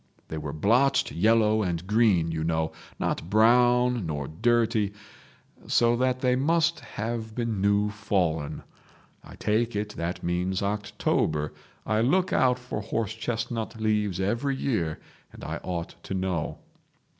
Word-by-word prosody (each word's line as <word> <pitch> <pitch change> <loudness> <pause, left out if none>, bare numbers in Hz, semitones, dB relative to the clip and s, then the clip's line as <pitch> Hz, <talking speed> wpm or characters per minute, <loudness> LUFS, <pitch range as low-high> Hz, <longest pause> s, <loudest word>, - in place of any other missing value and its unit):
They 80 - -4
were 75 -1 -5
blotched 115 - +2
yellow 110 +3 +3
and 90 -3 -2
green, 100 -6 +3
you 80 -1 -2
know, 80 0 0 0.3
not 80 - -2
brown 120 0 +4
nor 70 -3 -3
dirty, 110 +2 +1 0.7
so 120 0 +3
that 130 +1 0
they 125 -1 +3
must 165 +4 +2
have 115 -2 -5
been 115 -5 -2
new 100 +1 +2
fallen. 90 -8 -1 0.6
I - - -12
take 115 +2 0
it 105 0 -1
that 85 +2 -3
means 90 +2 -1
October. 100 -7 -1 0.3
I 110 0 +1
look 180 +10 +2
out 125 -1 +3
for 125 -4 -5
horse 110 +1 -2
chestnut 115 0 -3
leaves 105 -4 0
every 120 +8 0
year, 90 - -1 0.3
and - - -12
I - - -3
ought 85 -2 -5
to - - -3
know. 95 -4 -2
105 Hz, 140 wpm, -27 LUFS, 90-120 Hz, 0.7 s, brown